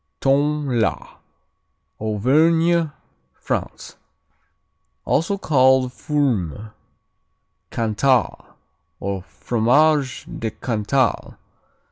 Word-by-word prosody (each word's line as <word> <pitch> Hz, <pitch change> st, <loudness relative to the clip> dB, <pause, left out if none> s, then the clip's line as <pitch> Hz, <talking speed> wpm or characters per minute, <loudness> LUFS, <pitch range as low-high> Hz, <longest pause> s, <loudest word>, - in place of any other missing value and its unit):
Tome, 140 Hz, -2 st, +1 dB
la 110 Hz, -, -2 dB, 0.8 s
Auvergne, 160 Hz, +10 st, +2 dB, 0.5 s
France -, -, -5 dB, 1.1 s
Also 185 Hz, +5 st, 0 dB
called 130 Hz, -6 st, +3 dB
Fourme, 110 Hz, -, -2 dB, 1.0 s
Cantal, 120 Hz, +3 st, 0 dB, 0.4 s
or 100 Hz, -1 st, -3 dB
Fromage 130 Hz, -, +1 dB
de 115 Hz, -, -2 dB
Cantal. 115 Hz, +2 st, -1 dB
130 Hz, 60 wpm, -21 LUFS, 110-150 Hz, 1.1 s, called